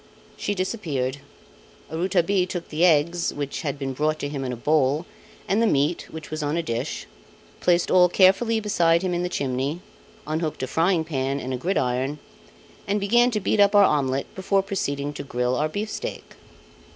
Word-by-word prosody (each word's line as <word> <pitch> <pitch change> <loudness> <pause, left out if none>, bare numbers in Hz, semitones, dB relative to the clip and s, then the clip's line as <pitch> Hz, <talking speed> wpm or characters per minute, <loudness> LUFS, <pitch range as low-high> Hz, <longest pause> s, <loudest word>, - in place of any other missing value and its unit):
She 205 - -2
disappeared. 155 - -2 0.7
Rouletabille 180 +2 +1
took 175 -2 -5
the 155 +3 0
eggs, 170 +1 +3
which 145 -1 -4
had 145 -3 -3
been 135 -1 -3
brought 155 +3 0
to 145 - -4
him 140 -2 -4
in 130 - -3
a - - -3
bowl, 145 +4 +1 0.4
and 205 +4 +2
the 230 - +4
meat 150 0 +1
which 160 -1 -9
was 155 0 -3
on 150 +2 -1
a 170 - 0
dish, 125 0 -3 0.5
placed 175 -1 +2
all 180 -1 +6
carefully 195 +5 +4
beside 170 -5 +2
him 185 -1 0
in 175 - 0
the 180 - -1
chimney, 140 +1 -2 0.5
unhooked 155 -2 -2
a - - -1
frying 165 +1 +1
pan 135 -3 -2
and 130 -1 -4
a - - -1
gridiron, 135 -3 -1 0.7
and 205 +1 +1
began 240 +5 +4
to 220 -3 -1
beat 210 - 0
up 200 0 +5
our 205 - +8
omelette 135 -4 0
before 195 +1 +1
proceeding 145 -8 -2
to - - -6
grill 125 -2 -1
our 150 +4 0
beefsteak. 215 - -5
160 Hz, 180 wpm, -24 LUFS, 140-190 Hz, 0.7 s, our